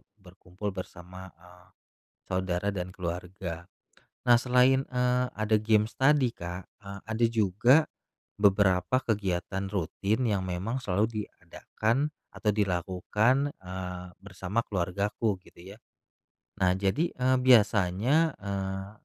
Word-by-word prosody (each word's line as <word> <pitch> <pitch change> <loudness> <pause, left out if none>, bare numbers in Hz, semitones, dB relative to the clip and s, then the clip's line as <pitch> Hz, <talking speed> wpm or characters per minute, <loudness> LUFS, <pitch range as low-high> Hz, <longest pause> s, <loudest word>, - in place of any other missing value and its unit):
berkumpul 95 0 -8
bersama, 90 0 -9
eee, 90 +1 -19 0.7
saudara 95 +1 -1
dan 90 -2 -5
keluarga. 90 -1 -5 0.6
Nah, 120 - +8
selain, 125 +2 +4
eee, 125 -1 +1
ada 110 +1 0
games 110 0 +2
tadi, 135 -1 +4
Kak, 90 +1 -7 0.2
eee, 100 0 -8
ada 110 +1 +1
juga 110 +3 +4 0.7
beberapa 100 +3 +3
kegiatan 95 -2 -1
rutin 100 +4 -1
yang 100 -5 0
memang 95 +8 -3
selalu 105 0 -1
diadakan 120 +7 -2 0.2
atau 105 - 0
dilakukan, 105 +8 +1
eee, 90 0 -6 0.2
bersama 95 +3 -3
keluargaku, 100 +3 -1
gitu 95 +3 -13
ya. - - -17 0.9
Nah, 90 0 +4
jadi, 100 - +1
eee, 130 +1 +1
biasanya, 120 - +4
eee, 95 -1 -4
100 Hz, 110 wpm, -28 LUFS, 90-115 Hz, 0.9 s, Nah